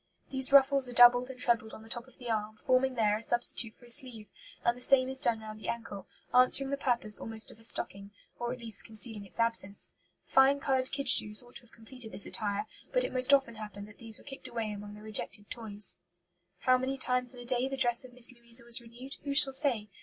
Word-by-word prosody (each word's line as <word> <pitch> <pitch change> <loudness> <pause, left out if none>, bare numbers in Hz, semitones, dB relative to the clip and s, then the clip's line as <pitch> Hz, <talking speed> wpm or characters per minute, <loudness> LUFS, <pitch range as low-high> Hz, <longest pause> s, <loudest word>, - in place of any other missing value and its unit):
These 265 -1 +4
ruffles 275 -1 +5
are - - -9
doubled 245 +1 +5
and 255 -1 -10
trebled 230 -3 -1
on 220 - -13
the - - -15
top 240 +2 -5
of 260 - -21
the 245 - -11
arm, 215 -1 -3
forming 255 +1 0
there 210 -3 +1
a - - -10
substitute 235 -1 -1
for 245 - -20
a 240 - -8
sleeve; 235 -3 +2 0.4
and 235 - +2
the 250 - -12
same 255 0 +3
is 265 0 -7
done 225 -2 0
around 215 0 -10
the - - -7
ankle, 230 -4 -7 0.3
answering 255 +2 +4
the - - 0
purpose 240 -6 -1
almost 225 -1 -5
of - - -18
a - - -14
stocking, 200 -3 -2 0.3
or 240 0 -4
at 255 - -6
least 225 -4 -3
concealing 220 -2 -2
its - - -13
absence. 230 -4 -1 0.3
Fine 270 +1 +3
coloured 265 -2 -1
kid 275 0 -4
shoes 210 -3 +8
ought 245 - -6
to - - -5
have 240 - -25
completed 230 0 -12
this 200 - +2
attire, 205 -1 -4 0.3
but - - +3
it - - -4
most 255 +1 +2
often 270 -4 +3
happened 210 -2 -10
that 210 - -18
these 225 -2 -2
were - - -18
kicked 270 -1 -11
away 225 -2 -5
among 205 0 -9
the 210 - -14
rejected 210 -1 -4
toys. 210 -4 0 0.6
"How 255 -1 +3
many 265 +1 -3
times 250 -1 -2
in - - -13
a 245 - -11
day 250 +1 +2
the 270 0 -6
dress 240 -2 +2
of 255 - -14
Miss 245 0 0
Louisa 235 -1 -3
was 235 0 -4
renewed, 240 +3 -12
who 280 -1 -4
shall 270 -1 +8
say? 260 -7 +2
240 Hz, 240 wpm, -29 LUFS, 220-260 Hz, 0.6 s, shoes